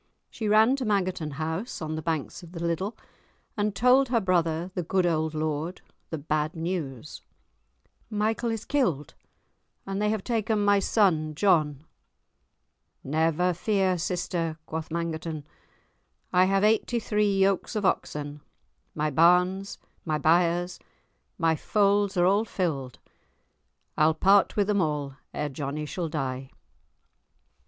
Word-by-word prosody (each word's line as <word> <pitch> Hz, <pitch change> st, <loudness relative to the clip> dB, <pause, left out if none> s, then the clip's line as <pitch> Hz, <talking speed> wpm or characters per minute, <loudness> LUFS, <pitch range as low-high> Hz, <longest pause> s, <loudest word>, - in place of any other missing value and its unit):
She 220 Hz, -, -4 dB
ran 220 Hz, +5 st, +5 dB
to 265 Hz, -, -3 dB
Mangerton 185 Hz, -7 st, 0 dB
House, 160 Hz, -, -4 dB
on 155 Hz, -1 st, -4 dB
the 155 Hz, -, -3 dB
banks 160 Hz, -3 st, -3 dB
of 170 Hz, -1 st, -13 dB
the 170 Hz, -, -6 dB
Liddel, 170 Hz, +6 st, -2 dB, 0.6 s
and 210 Hz, -1 st, -1 dB
told 250 Hz, +4 st, +4 dB
her 240 Hz, -2 st, +3 dB
brother, 175 Hz, -2 st, 0 dB
the 180 Hz, -, -2 dB
good 180 Hz, +2 st, +1 dB
old 160 Hz, -2 st, 0 dB
lord, 155 Hz, +3 st, -2 dB, 0.3 s
the 160 Hz, -, -3 dB
bad 155 Hz, +2 st, -1 dB
news. 160 Hz, -5 st, -4 dB, 0.9 s
"Michael 220 Hz, +2 st, 0 dB
is 225 Hz, -1 st, -3 dB
killed, 180 Hz, -, 0 dB, 0.7 s
and 195 Hz, +1 st, -3 dB
they 210 Hz, -, +2 dB
have 215 Hz, -2 st, -1 dB
taken 225 Hz, -2 st, 0 dB
my 205 Hz, 0 st, +5 dB
son 165 Hz, -8 st, +2 dB
John." 155 Hz, -6 st, +2 dB, 1.2 s
"Never 160 Hz, +5 st, +1 dB
fear, 190 Hz, +1 st, +1 dB
sister," 165 Hz, -2 st, -2 dB
quoth 160 Hz, 0 st, -5 dB
Mangerton, 160 Hz, -2 st, -4 dB, 0.9 s
"I 180 Hz, +1 st, +5 dB
have 195 Hz, +1 st, +2 dB
eighty 220 Hz, +3 st, +2 dB
three 210 Hz, -2 st, +1 dB
yokes 195 Hz, +3 st, +1 dB
of 210 Hz, -2 st, -1 dB
oxen, 150 Hz, -4 st, -2 dB, 0.5 s
my 150 Hz, 0 st, 0 dB
barns, 180 Hz, +5 st, +3 dB, 0.3 s
my 155 Hz, -2 st, -1 dB
byres, 175 Hz, +3 st, +2 dB, 0.6 s
my 165 Hz, -1 st, +2 dB
folds 200 Hz, +2 st, +1 dB
are 175 Hz, -, +4 dB
all 200 Hz, +4 st, +3 dB
filled, 145 Hz, -, -3 dB, 1.0 s
I'll 155 Hz, +1 st, +3 dB
part 195 Hz, +4 st, +4 dB
with 205 Hz, -, +2 dB
them 205 Hz, -1 st, +1 dB
all 145 Hz, -4 st, -2 dB
ere 150 Hz, -, -2 dB
Johnie 145 Hz, +2 st, -4 dB
shall 165 Hz, +2 st, -4 dB
die." 135 Hz, -3 st, -3 dB
175 Hz, 135 wpm, -27 LUFS, 155-200 Hz, 1.2 s, ran